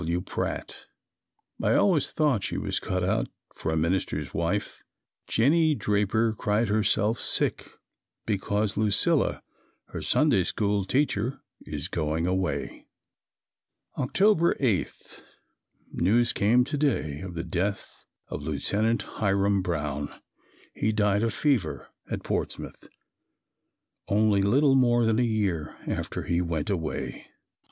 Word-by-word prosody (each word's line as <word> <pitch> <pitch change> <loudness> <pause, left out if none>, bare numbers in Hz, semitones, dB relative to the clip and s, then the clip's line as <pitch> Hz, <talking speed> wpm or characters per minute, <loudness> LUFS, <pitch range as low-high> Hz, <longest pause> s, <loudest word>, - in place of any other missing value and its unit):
W. 85 +1 -1
Pratt. 90 - -5 0.7
I - - +2
always 175 -8 +3
thought 145 -10 +1
she - - -2
was - - -1
cut 90 0 -2
out 105 +5 0 0.3
for 80 - -3
a 80 - 0
minister's 85 +4 -1
wife. 85 +5 -2 0.5
Jennie 155 +6 +3
Draper 105 +1 +1
cried 105 +1 0
herself 110 +1 +2
sick - - 0 0.6
because 105 0 0
Lucilla, 105 -1 +2 0.5
her - - -6
Sunday - - +3
School 100 -2 0
teacher, 130 0 0 0.2
is 75 +1 -3
going 80 -1 -1
away. 95 0 -2 1.1
October 170 +5 +2
8. 115 - -2 0.7
News 115 +6 +2
came 115 +5 +3
to 145 +3 -3
day 75 - 0
of 95 -2 -7
the 85 - -3
death 95 +3 -3 0.2
of - - -5
Lieutenant 100 +10 0
Hiram 100 -1 +1
Brown. 75 -5 -2 0.6
He 110 - 0
died 105 -1 +2
of 115 0 +1
fever 95 - 0 0.2
at - - -4
Portsmouth, - - -4 1.2
only 105 -1 +3
little 135 +8 +4
more 120 -3 +4
than 110 +1 +2
a - - +3
year 100 -9 -1
after - - -3
he 85 +1 0
went 85 0 -2
away. 80 -5 -4
105 Hz, 120 wpm, -27 LUFS, 90-115 Hz, 1.2 s, little